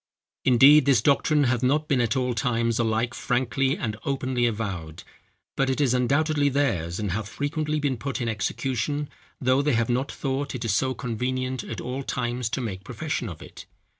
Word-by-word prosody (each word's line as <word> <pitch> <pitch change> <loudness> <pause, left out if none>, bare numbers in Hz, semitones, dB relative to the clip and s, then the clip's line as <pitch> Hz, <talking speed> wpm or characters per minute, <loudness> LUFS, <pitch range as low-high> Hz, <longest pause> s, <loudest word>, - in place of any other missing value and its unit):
"Indeed, 135 +3 +7
this 135 -5 +5
doctrine 145 +2 +3
hath 125 -2 +1
not 150 +4 +1
been 135 -4 +2
at 120 +1 0
all 125 -1 0
times 115 0 0
alike 115 +1 0
frankly 130 +2 0
and 110 -4 -3
openly 130 -3 0
avowed; 95 -8 -4 0.5
but 135 -1 +1
it 130 - 0
is 135 -4 +3
undoubtedly 145 +4 +2
theirs, 95 - 0
and 105 -3 -2
hath 105 +2 -3
frequently 150 +1 -2
been 140 -3 0
put 140 +4 -4
in 120 - -2
execution, 130 +6 -2 0.3
though 130 +1 +3
they 150 0 +1
have 115 0 +1
not 130 +3 0
thought 135 0 -3
it 120 -2 -3
so 130 +5 +1
convenient 130 +1 -2
at - - -6
all 125 +2 -4
times 120 -2 -2
to 130 - -2
make 100 -5 -5
profession 140 0 -3
of 80 -4 -9
it. - - -12
125 Hz, 180 wpm, -25 LUFS, 115-140 Hz, 0.5 s, Indeed